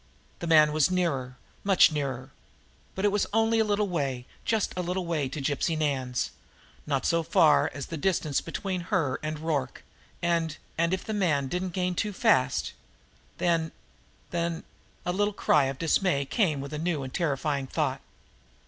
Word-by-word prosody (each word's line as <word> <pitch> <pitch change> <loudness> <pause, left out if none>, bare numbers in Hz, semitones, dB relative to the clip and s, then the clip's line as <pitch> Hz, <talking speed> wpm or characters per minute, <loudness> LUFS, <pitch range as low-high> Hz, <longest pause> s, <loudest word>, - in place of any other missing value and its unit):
The 170 - -4
man 155 -2 +6
was 155 +2 +3
nearer 140 -9 -1 0.3
much 195 -4 +6
nearer. 135 -3 -3 0.6
But 190 - -1
it 205 - +4
was 205 0 +1
only 225 +1 +3
a - - +5
little 210 -1 +1
way, 135 -8 -2 0.2
just 220 -3 0
a 180 - -1
little 180 +1 -2
way, 155 -5 -1
to 140 - -5
Gypsy 145 +3 0
Nan's 135 -5 -1 0.6
not 140 -3 0
so 170 -1 +2
far 160 -1 +4
as 140 0 -6
the 165 - -6
distance 155 -4 0
between 185 +2 -3
her 165 - +1
and 155 0 -3
Rorke 150 -5 -2 0.4
and 170 -2 0 0.2
and 170 +1 +1
if 190 0 -2
the 220 - -3
man 150 -10 +1
didn't 180 +3 -2
gain 180 -1 0
too 210 +3 -2
fast, 130 - +2 0.6
then 165 -2 +1 0.6
then 170 -1 -2 0.4
A 180 - +1
little 205 +2 0
cry 150 -7 +3
of 135 0 -3
dismay 165 -2 +1
came 155 - +1
with 140 +2 -7
a 150 - -3
new 160 -4 -1
and 130 - -7
terrifying 145 -4 -1
thought. - - -1
165 Hz, 170 wpm, -28 LUFS, 140-185 Hz, 0.6 s, man